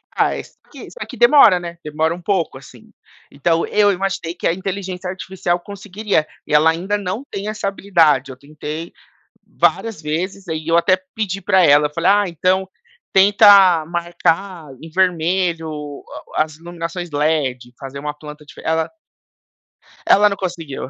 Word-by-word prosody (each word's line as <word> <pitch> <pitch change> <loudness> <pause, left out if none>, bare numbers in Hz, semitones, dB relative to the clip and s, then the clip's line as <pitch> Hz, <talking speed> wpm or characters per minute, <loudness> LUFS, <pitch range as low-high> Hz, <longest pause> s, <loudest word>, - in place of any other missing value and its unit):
Ah, - - +1
esse - - -9
que - - -11
só - - -7
que - - -10
demora, 285 - +6
né. 170 -1 -8
Demora 155 +2 -1
um 175 - -9
pouco, 175 -6 -1
assim. 125 -3 -16 0.4
Então, 165 +3 0
eu 205 -1 +3
imaginei 190 -3 -3
que 175 - -2
a - - +2
inteligência 185 0 -5
artificial 180 -1 -3
conseguiria, 200 -2 -2 0.2
e 150 - -5
ela 150 +2 +5
ainda 185 +5 -2
não 205 +5 -4
tem 200 +1 -5
essa 215 -2 -3
habilidade. 165 -9 +2
Eu 130 - -11
tentei 150 +3 -7 0.6
várias 225 -7 0
vezes, 180 +6 -4
aí 160 -1 -4
eu 165 0 +3
até 185 +2 +3 0.2
pedi 195 -3 -3
pra 190 -2 +3
ela, 145 0 +5
eu 150 - -20
falei: 170 +4 +2
"Ah, 205 0 +4
então 185 +3 0 0.4
tenta 195 -4 +6
marcar 170 0 -2
em 165 - -10
vermelho 175 -1 0
o 150 -2 -7 0.3
a - - +4
as 155 -1 -11
iluminações 170 +1 -6
LED, 145 -5 -1
fazer 135 0 -8
uma 150 +1 -4
planta 150 0 -12
dife", - - -13
ela 160 0 0 1.2
ela 210 +1 +6
não 200 - -4
conseguiu. 165 -8 -5
175 Hz, 165 wpm, -19 LUFS, 155-190 Hz, 1.2 s, demora